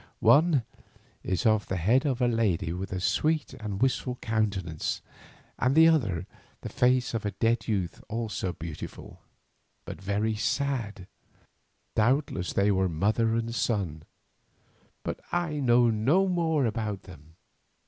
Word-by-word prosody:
One 150 -3 +5 0.6
is 95 -3 -2
of 110 -2 +3
the 95 - -2
head 120 - +2
of 130 -2 -1
a 125 - +4
lady 105 -8 0
with 95 +1 -5
a 95 - -2
sweet 155 - 0
and 105 -3 -4
wistful 130 -1 0
countenance, 100 -9 -2 0.6
and 130 +2 +2
the 160 +1 +8
other 105 - +1 0.4
the - - -6
face 125 0 +2
of 115 - -2
a 105 - 0
dead 115 +1 +1
youth 95 -6 -2
also 110 -4 -2
beautiful, 80 -2 -8 0.6
but - - -8
very 100 +3 0
sad. 110 -4 -2 0.9
Doubtless 115 -5 +1
they 100 +1 +3
were 95 -1 +1
mother 110 +7 +1
and 115 0 -2
son, 95 -10 -1 1.0
but - - -4
I 170 -4 -1
know 120 -3 +4
no 140 - +2
more 165 -6 +1
about 110 -4 -2
them. 80 -3 -15
110 Hz, 140 wpm, -28 LUFS, 95-130 Hz, 1.0 s, the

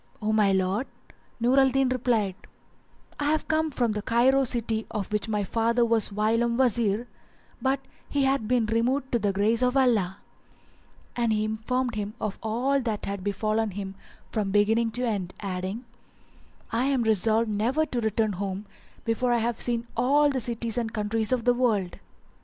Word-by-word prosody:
"O 215 0 0
my 210 -2 +4
lord," 190 +6 0 0.5
Nur 250 +4 +4
al 270 0 +5
Din 270 0 +2
replied, 235 -6 +1 0.9
"I 290 - -1
have 310 +1 +1
come 315 0 +1
from 240 -6 0
Cairo 240 +6 +3
city 225 -2 -1
of 210 -2 -4
which 210 +1 -1
my 210 -1 0
father 230 +3 +1
was 225 -2 +1
whilome 230 +3 +1
Wazir; 235 -3 +1 0.5
but 265 0 +1 0.3
he 285 -1 +1
hath 270 -5 +1
been 245 -1 +2
removed 250 +5 0
to 240 - +2
the 205 -2 +1
grace 210 +4 +1
of 250 +1 +2
Allah;" 215 -8 +2 1.0
and 235 -2 +1
he 215 0 +1
informed 235 +3 -1
him 210 0 -4
of 215 -2 -3
all 250 +6 0
that 225 -4 -3
had 200 -1 -4
befallen 215 +2 0
him 195 0 -6 0.4
from 210 -3 -1
beginning 220 +3 +3
to 245 +1 -1
end, 195 -5 -3
adding, 190 +4 -4 0.9
"I 235 +3 +1
am 270 -3 +1
resolved 220 +1 +2
never 245 +10 +1
to 245 -5 -3
return 220 0 +1
home 195 +2 -4 0.4
before 240 +2 +1
I 240 - +3
have 235 0 -1
seen 235 -1 0
all 285 +5 +3
the 265 - -1
cities 235 0 -2
and 225 -2 -3
countries 215 +1 -1
of 250 -2 +1
the 245 - +5
world." 220 -7 0
230 Hz, 170 wpm, -26 LUFS, 210-250 Hz, 1.0 s, al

